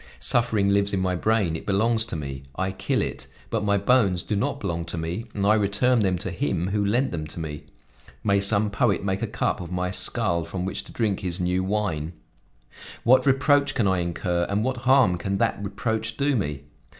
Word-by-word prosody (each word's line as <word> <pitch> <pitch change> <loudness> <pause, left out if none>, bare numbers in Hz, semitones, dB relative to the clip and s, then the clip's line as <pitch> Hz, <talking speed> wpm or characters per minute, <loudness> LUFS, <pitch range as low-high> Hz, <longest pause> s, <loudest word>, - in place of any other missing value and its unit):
Suffering 110 -4 +2
lives 100 0 +2
in 95 - +1
my 95 -1 0
brain; 100 -4 +1
it - - -7
belongs 110 +3 +2
to 110 - -4
me, 70 -3 -5
I 95 +4 -1
kill 95 - -1
it; - - -5 0.2
but - - 0
my 100 -1 +2
bones 100 -4 +2
do 105 - -2
not 100 - -1
belong 85 -4 -2
to - - -5
me 85 +7 -3
and 100 -1 0
I 105 - +5
return 110 +4 +2
them 95 -4 +1
to 95 +1 -4
Him 90 0 -1
who 105 +1 0
lent 120 +7 +1
them 80 -3 -4
to 80 - -6
me: 75 -1 -6 0.6
may 100 -1 +3
some 100 +1 +2
poet 105 -4 +1
make 95 -1 -1
a - - -1
cup - - -1
of 85 -1 -8
my 90 0 -1
skull 85 -2 +1
from 90 +2 -4
which 95 +1 -3
to - - -13
drink 105 -5 -1
his 90 -1 -2
new 90 +1 0
wine 95 -6 -2 0.9
What 130 +4 +5
reproach 140 +1 +3
can 110 - +2
I 95 -1 +2
incur 85 0 -1
and 100 +2 0
what 130 +1 -1
harm 125 -10 +5
can 95 +1 -2
that 100 - 0
reproach 110 +2 -2
do 140 0 +1
me? 75 - -2
100 Hz, 210 wpm, -25 LUFS, 90-110 Hz, 0.9 s, I